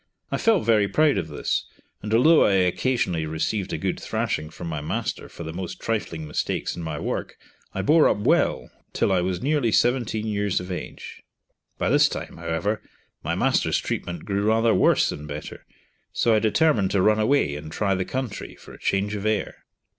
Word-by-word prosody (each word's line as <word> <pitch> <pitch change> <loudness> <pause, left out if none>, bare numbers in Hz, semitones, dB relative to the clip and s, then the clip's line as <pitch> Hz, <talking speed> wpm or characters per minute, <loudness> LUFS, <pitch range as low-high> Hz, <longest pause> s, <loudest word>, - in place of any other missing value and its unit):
I - - 0
felt 225 -5 +2
very 110 -3 +4
proud 150 - +3
of 80 - -4
this, 75 - -2 0.3
and 105 - -5
although 150 +9 +6
I 100 - +3
occasionally 90 -3 +1
received 85 +6 -2
a - - -1
good - - -2
thrashing 75 0 -2
from 85 +1 -8
my 80 -3 -3
master 75 - -3
for 85 - -9
the 80 0 -6
most 90 0 -6
trifling 85 -8 -3
mistakes 75 - -2
in 85 - -6
my 80 -2 -4
work, - - -4 0.4
I 95 - -1
bore 155 +8 +5
up - - +1
well 105 - +1 0.2
till - - +1
I 95 -2 +3
was 90 +4 -2
nearly 140 -5 +1
seventeen 120 -2 +1
years 105 -2 0
of 90 +1 -7
age. 90 - -7 0.6
By - - 0
this - - +5
time, - - -6
however, 100 +7 -2 0.4
my - - -1
master's - - +2
treatment 85 -2 -4
grew 100 -1 -1
rather 115 +1 +3
worse - - +4
than 75 +1 -6
better, 75 +1 -8 0.4
so 115 - +2
I 110 - +4
determined 110 - +2
to 100 - +1
run 110 0 +4
away 110 - +2
and 75 +1 -8
try 100 +3 0
the 95 0 0
country, 130 +1 -5
for - - -14
a - - -13
change 100 +2 0
of 100 -2 -4
air. 110 -2 -2
100 Hz, 190 wpm, -24 LUFS, 85-115 Hz, 0.6 s, although